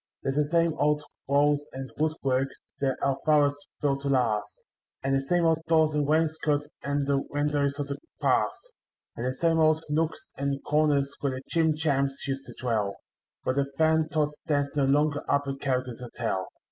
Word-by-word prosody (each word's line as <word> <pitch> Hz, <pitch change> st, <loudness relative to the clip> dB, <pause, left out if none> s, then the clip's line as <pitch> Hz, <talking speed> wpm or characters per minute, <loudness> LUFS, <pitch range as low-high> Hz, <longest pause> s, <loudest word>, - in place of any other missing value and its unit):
There's 135 Hz, -, -1 dB
the 150 Hz, -, +3 dB
same 165 Hz, +1 st, +2 dB
old 150 Hz, 0 st, +2 dB, 0.2 s
walls 145 Hz, +1 st, +3 dB
and 130 Hz, 0 st, -6 dB
woodwork 135 Hz, -4 st, +1 dB, 0.3 s
that 135 Hz, -2 st, 0 dB
our 135 Hz, 0 st, +1 dB
fathers 145 Hz, -2 st, +4 dB, 0.3 s
built 140 Hz, -1 st, +1 dB
to 140 Hz, -, -2 dB
last, 120 Hz, -6 st, 0 dB, 0.4 s
And 135 Hz, 0 st, +1 dB
the 135 Hz, -, +3 dB
same 170 Hz, +5 st, +1 dB
old 160 Hz, -1 st, +3 dB
doors 160 Hz, -2 st, +4 dB
and 150 Hz, -1 st, +1 dB
wainscot 155 Hz, -1 st, +1 dB, 0.2 s
and 140 Hz, 0 st, -1 dB
the 140 Hz, 0 st, +2 dB
windows 145 Hz, -1 st, 0 dB
of 145 Hz, -, -2 dB
the 140 Hz, 0 st, -5 dB, 0.2 s
past; -, -, 0 dB, 0.4 s
And 120 Hz, -, -3 dB
the 130 Hz, -, 0 dB
same 165 Hz, +3 st, +2 dB
old 155 Hz, 0 st, +4 dB
nooks 160 Hz, +2 st, -1 dB
and 140 Hz, 0 st, -1 dB
corners 145 Hz, -2 st, +2 dB
where 140 Hz, -2 st, -1 dB
the 130 Hz, +1 st, -6 dB
Jim 160 Hz, -2 st, +3 dB
Jams 140 Hz, -3 st, 0 dB
used 135 Hz, 0 st, -3 dB
to -, -, -10 dB
dwell; 110 Hz, -5 st, 0 dB, 0.5 s
But 130 Hz, -, 0 dB
the 140 Hz, 0 st, 0 dB
Fantods 160 Hz, -1 st, +2 dB
dance 145 Hz, -2 st, 0 dB
no 140 Hz, -2 st, +3 dB
longer 145 Hz, +1 st, +2 dB
up 140 Hz, -, +3 dB
at 135 Hz, 0 st, -3 dB
Callaghan's 130 Hz, -3 st, -1 dB
Hotel. 115 Hz, -6 st, -3 dB
145 Hz, 180 wpm, -27 LUFS, 135-155 Hz, 0.5 s, fathers